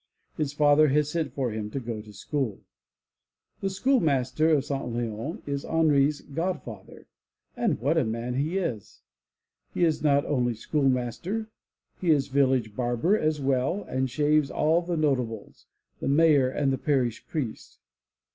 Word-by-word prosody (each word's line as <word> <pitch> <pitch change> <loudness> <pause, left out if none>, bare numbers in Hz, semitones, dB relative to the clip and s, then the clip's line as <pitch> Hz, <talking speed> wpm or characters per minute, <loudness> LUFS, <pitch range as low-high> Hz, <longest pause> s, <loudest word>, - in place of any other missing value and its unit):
His 150 -3 -1
father 145 +1 +5
has 150 +1 +1
sent 160 -5 -2
for 130 -3 -2
him 105 -1 -4
to 135 - -4
go 115 -3 -5
to 105 0 -13
school. 115 +1 -3 1.0
The 195 - -1
schoolmaster 160 - +1
of 145 -4 +3
St. 140 -1 -3
Leons 120 - -4
is 140 -1 -2
Henri's 150 -3 +2
god 170 +6 -3
father, 105 -5 -11 0.5
and - - 0
what 145 +7 +2
a - - +2
man 115 +2 -3
he 150 +8 -1
is! 125 - -4 0.7
He - - +1
is 160 -2 0
not 145 -2 +3
only 125 -4 0
schoolmaster; 135 - -1 0.5
he 180 - -1
is 145 -4 +3
village 130 -5 +1
barber 120 - +1
as 155 -6 0
well 135 +7 0
and 130 0 -2
shaves 150 +2 +2
all 160 +3 +2
the 175 -1 -3
notables, 125 -8 -2 0.3
the - - -4
mayor 145 -2 +4
and 135 0 -1
parish 130 -6 0
priest. 140 -9 -5
140 Hz, 150 wpm, -27 LUFS, 125-155 Hz, 1.0 s, father